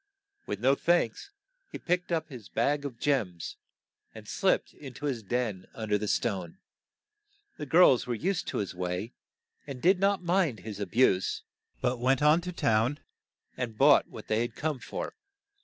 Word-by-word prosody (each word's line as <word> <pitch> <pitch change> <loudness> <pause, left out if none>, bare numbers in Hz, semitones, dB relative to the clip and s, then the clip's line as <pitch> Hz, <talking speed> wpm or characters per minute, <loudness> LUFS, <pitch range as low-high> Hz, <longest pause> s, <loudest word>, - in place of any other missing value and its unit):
With 100 - -3
no 130 +3 +5
thanks, 170 - +1 0.4
he - - -5
picked 180 +1 -1
up 160 -2 0
his 125 -9 -11
bag 145 +5 0
of 130 -5 -5
gems, 110 - -1 0.6
and - - -11
slipped - - +1
in 135 -3 -11
to 145 - -6
his 130 -6 -1
den 105 -3 -2
un 110 -2 -5
der 105 0 +2
the 105 - -3
stone. 95 -6 -1 1.0
The 150 - -5
girls 160 -6 +5
were 120 - -1
used 180 - -1
to - - -3
his 100 - -2
way, 90 +5 -3 0.5
and 135 -3 -6
did 180 +6 +4
not 195 -1 +2
mind 170 - +1
his 105 0 -7
a 100 - -3
buse. 95 -3 +2 0.4
but 125 0 0
went 130 +3 +2
on 155 +3 +5
to 180 +1 -5
town 115 -2 +1 0.6
and 120 -4 -4
bought 140 +1 +6
what 110 - -10
they 110 +1 +1
had 120 -1 -3
come 150 -3 -2
for. - - -5
125 Hz, 175 wpm, -29 LUFS, 110-150 Hz, 1.0 s, bought